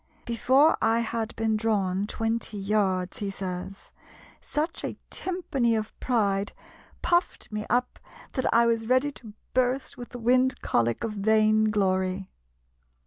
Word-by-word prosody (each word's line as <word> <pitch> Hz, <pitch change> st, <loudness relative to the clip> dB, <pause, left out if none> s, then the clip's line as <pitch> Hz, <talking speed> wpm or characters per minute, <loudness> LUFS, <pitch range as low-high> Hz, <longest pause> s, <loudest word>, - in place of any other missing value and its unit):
"Before 260 Hz, +6 st, +4 dB
I 225 Hz, +1 st, +3 dB
had 230 Hz, 0 st, -3 dB
been 220 Hz, -1 st, +1 dB
drawn 205 Hz, -3 st, 0 dB
twenty 225 Hz, -1 st, -2 dB
yards," 195 Hz, -3 st, 0 dB
he 205 Hz, -, -2 dB
says, 190 Hz, 0 st, -6 dB, 0.5 s
"such 310 Hz, +3 st, -3 dB
a -, -, -4 dB
timpany 275 Hz, -11 st, -1 dB
of 215 Hz, -1 st, -3 dB
pride 205 Hz, -5 st, 0 dB, 0.5 s
puft 345 Hz, -7 st, 0 dB
me 210 Hz, 0 st, -4 dB
up 250 Hz, +2 st, 0 dB, 0.3 s
that 260 Hz, -, 0 dB
I 235 Hz, 0 st, +5 dB
was 230 Hz, -1 st, +1 dB
ready 255 Hz, +4 st, +3 dB
to 225 Hz, -6 st, -11 dB, 0.2 s
burst 255 Hz, +1 st, 0 dB
with 245 Hz, -, -8 dB
the 245 Hz, -, -8 dB
wind 255 Hz, +2 st, +2 dB
cholic 115 Hz, 0 st, +1 dB
of 225 Hz, -2 st, -2 dB
vaine 215 Hz, +1 st, +3 dB
glory." 190 Hz, -2 st, 0 dB
220 Hz, 140 wpm, -27 LUFS, 200-245 Hz, 0.5 s, I